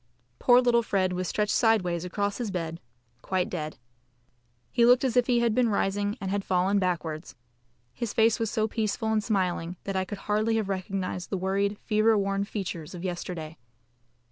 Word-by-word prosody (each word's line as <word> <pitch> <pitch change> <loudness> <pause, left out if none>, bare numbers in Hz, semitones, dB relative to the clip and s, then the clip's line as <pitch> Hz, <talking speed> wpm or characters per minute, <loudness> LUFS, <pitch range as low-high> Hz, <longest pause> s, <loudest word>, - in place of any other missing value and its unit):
Poor 245 0 +6
little 240 -1 +4
Fred 190 -4 0
was 180 0 -2
stretched 210 +3 0
sideways 180 -7 +2
across 200 +3 -2
his 235 -3 -2
bed, 165 -3 -4 0.4
quite 185 -1 -1
dead. 155 -3 -4 0.9
He 235 - +3
looked 245 +2 +6
as 255 -3 0
if 245 -1 +4
he 240 -2 +3
had 235 -2 +2
been 245 0 +3
rising 205 0 0
and 190 -2 -3
had 200 0 -1
fallen 190 +2 +2
backwards. 170 -5 -2 0.6
His 235 -3 -3
face 225 +1 +3
was 225 -2 0
so 220 -1 0
peaceful 220 0 -1
and 215 -1 +1
smiling 180 -4 -1
that 195 - -4
I 190 0 0
could 205 +2 -6
hardly 215 +2 +1
have 215 -3 -1
recognised 185 -1 -3
the 195 - -1
worried, 200 +2 0
fever 215 0 +3
worn 195 0 0
features 180 -5 -5
of 175 - -8
yesterday. 175 -3 -5
200 Hz, 180 wpm, -27 LUFS, 180-220 Hz, 0.9 s, Poor